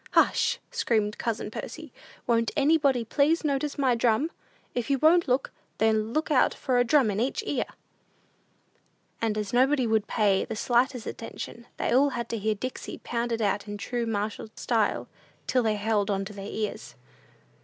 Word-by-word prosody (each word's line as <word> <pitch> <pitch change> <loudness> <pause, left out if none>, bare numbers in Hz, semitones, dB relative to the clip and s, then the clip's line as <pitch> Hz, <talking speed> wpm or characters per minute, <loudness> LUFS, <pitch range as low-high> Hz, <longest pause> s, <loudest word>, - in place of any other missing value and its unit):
"Hush!" - - +3
screamed 220 - 0
cousin 220 -2 -2
Percy; 315 +4 -7 0.3
"won't 230 -1 +2
anybody 280 -5 +3
please 300 +8 +2
notice 285 0 -1
my 265 -3 +3
drum? 235 +6 +2 0.4
If 245 0 -2
you 275 - +3
won't 335 +5 +4
look, 255 +1 +1 0.3
then 220 0 +2
look 310 +4 -1
out 275 - +4
for 250 -2 +1
a - - +5
drum 245 -2 +3
in 200 - -2
each 250 +4 -1
ear!" - - -1 1.6
And 220 -2 0
as 210 +2 -3
nobody 260 +1 +3
would 220 -1 +3
look 205 - -32
or - - -3
pay 200 -3 +3
the - - -5
slightest 245 +2 +1
attention, 235 +1 -7
they - - -1
all 275 +3 +5
had 235 - -4
to 230 - -2
hear 215 +1 0
"Dixie" 255 +5 -6
pounded 235 -1 -1
out 200 0 0
in 205 0 -5
true 235 +3 -3
martial 210 0 -2
style, 215 - 0 0.4
till 255 - +2
they 220 -2 +1
held 210 -1 0
on 195 -1 0
to 210 - -8
their 195 0 -7
ears. 215 -2 -4
235 Hz, 175 wpm, -27 LUFS, 215-265 Hz, 1.6 s, a